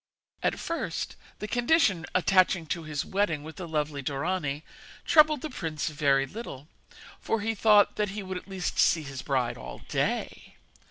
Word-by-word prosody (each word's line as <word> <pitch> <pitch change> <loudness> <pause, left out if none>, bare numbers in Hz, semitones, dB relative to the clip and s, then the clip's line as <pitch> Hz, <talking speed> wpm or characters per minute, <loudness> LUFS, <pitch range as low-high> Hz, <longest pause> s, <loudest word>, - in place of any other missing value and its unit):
At - - +1
first, 335 0 -3 0.2
the 210 - -5
condition 240 - +2
attaching 185 -1 +4
to 170 - -6
his 155 -2 -3
wedding 180 -7 0
with 160 +1 -10
the 180 -3 -6
lovely 150 -2 -2
Dorani 145 +1 -2 0.4
troubled 305 -3 +5
the 310 - -4
prince 160 -10 -3
very 140 -3 +2
little, 150 - -8 0.5
for 225 - -1
he 225 +2 0
thought 210 -1 +5
that 210 -1 +1
he 205 +1 -5
would 190 -1 -4
at 180 - -10
least 190 -2 -3
see 160 - +4
his 135 -2 -6
bride 130 -4 -1
all - - -9
day. - - -2
175 Hz, 165 wpm, -28 LUFS, 150-210 Hz, 0.5 s, troubled